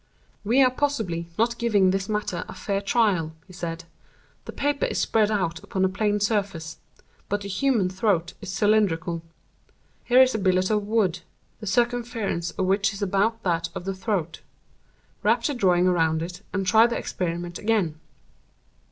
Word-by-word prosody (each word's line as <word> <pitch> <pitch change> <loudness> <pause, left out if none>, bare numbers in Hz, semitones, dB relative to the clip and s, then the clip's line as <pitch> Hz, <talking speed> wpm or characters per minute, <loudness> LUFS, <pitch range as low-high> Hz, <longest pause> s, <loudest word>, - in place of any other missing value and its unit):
"We 240 +6 +4
are 255 - +4
possibly 220 -12 -1
not 235 +1 +1
giving 205 -6 +3
this 195 +1 -2
matter 210 0 -2
a - - -8
fair 200 -1 -2
trial," 195 -7 +1
he 185 - -15
said. 170 -1 -5 0.6
"The - - -6
paper 285 0 0
is - - -3
spread 215 -2 +2
out 170 -6 -1
upon 190 -1 0
a - - +2
plane 210 +2 0
surface; 200 -6 -1 0.5
but 205 0 -1
the 200 - -6
human 215 0 +1
throat 185 -2 0
is 200 -3 -6
cylindrical. 185 -5 +1 0.8
Here 250 +1 +5
is 260 - +1
a 220 - -1
billet 185 0 +2
of 210 -1 0
wood, 205 -6 +1 0.4
the 215 - -8
circumference 230 -5 0
of 185 - -2
which 195 +2 +2
is 200 +1 -5
about 205 +4 0
that 170 -2 0
of 175 - -6
the 195 - -2
throat. 190 -4 -3 0.8
Wrap 230 +3 +2
the 290 - 0
drawing 180 -7 +3
around 165 -3 +2
it, 180 +2 -7
and 195 0 -2
try 220 +5 +6
the 235 - -2
experiment 175 -1 -4
again." 200 -8 0
195 Hz, 170 wpm, -25 LUFS, 180-220 Hz, 0.8 s, try